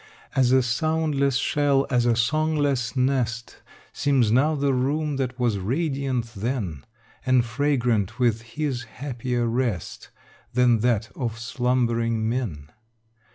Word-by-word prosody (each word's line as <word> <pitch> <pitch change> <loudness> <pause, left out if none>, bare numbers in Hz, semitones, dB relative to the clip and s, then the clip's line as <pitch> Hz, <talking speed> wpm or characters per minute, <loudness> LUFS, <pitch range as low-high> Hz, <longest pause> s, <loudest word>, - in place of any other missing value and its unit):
As 130 -2 +3
a 130 0 +5
soundless 145 +1 0
shell, 140 0 +2
as 120 -1 +2
a 120 - +3
songless 145 -1 0
nest, 125 -3 -1 0.4
Seems 130 -6 +2
now 145 +6 +3
the 140 -1 +1
room 145 +3 0
that 130 -1 -3
was 115 -5 +1
radiant 130 - -2
then 100 - -3 0.4
And 130 -2 +3
fragrant 120 -5 0
with 115 -3 +1
his 130 +2 -3
happier 125 -1 -3
rest 115 -7 -2 0.5
Than 125 -2 +4
that 115 -2 0
of 115 -3 -3
slumbering 115 -2 0
men. 95 - -3
125 Hz, 120 wpm, -24 LUFS, 115-140 Hz, 0.5 s, a